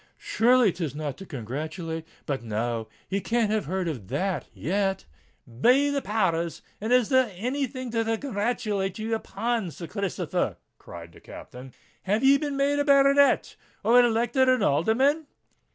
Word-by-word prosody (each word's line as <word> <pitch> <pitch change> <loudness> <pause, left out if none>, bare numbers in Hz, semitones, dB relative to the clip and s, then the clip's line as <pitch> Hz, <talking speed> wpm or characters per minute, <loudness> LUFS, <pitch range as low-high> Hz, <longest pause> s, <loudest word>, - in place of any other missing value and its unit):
Surely 250 - +3
'tis 160 -6 -4
not 150 -2 -4
to 195 - -11
congratulate——But, 155 - -5
no—he 115 - -4
can't 230 -1 0
have 215 -5 0
heard 185 +3 -2
of 125 - -5
that 165 - -2
yet." 195 +4 -1 0.4
Be 250 - +3
the 280 -1 -1
power 190 -6 +1
rs! 170 - -9 0.2
and 220 +3 -2
is 250 -3 +4
there 260 -4 +3
any 260 +8 -2
thing 255 -1 -7
to 230 -1 0
congratulate 210 -5 -2
ye 220 +1 -4
upon, 225 -2 -2
Sir 170 +2 -8
Christopher?" 200 +1 -2 0.2
cried 85 -1 -11
the - - -16
Captain. 125 +1 -11 0.3
"Have 210 +6 0
ye 275 +1 +6
been 285 -2 -3
made 285 +1 +1
a - - +3
baronet—or 275 -3 +3
elected 240 +3 +2
an 255 -5 +3
alderman?" 260 - +2
210 Hz, 150 wpm, -26 LUFS, 165-255 Hz, 0.4 s, ye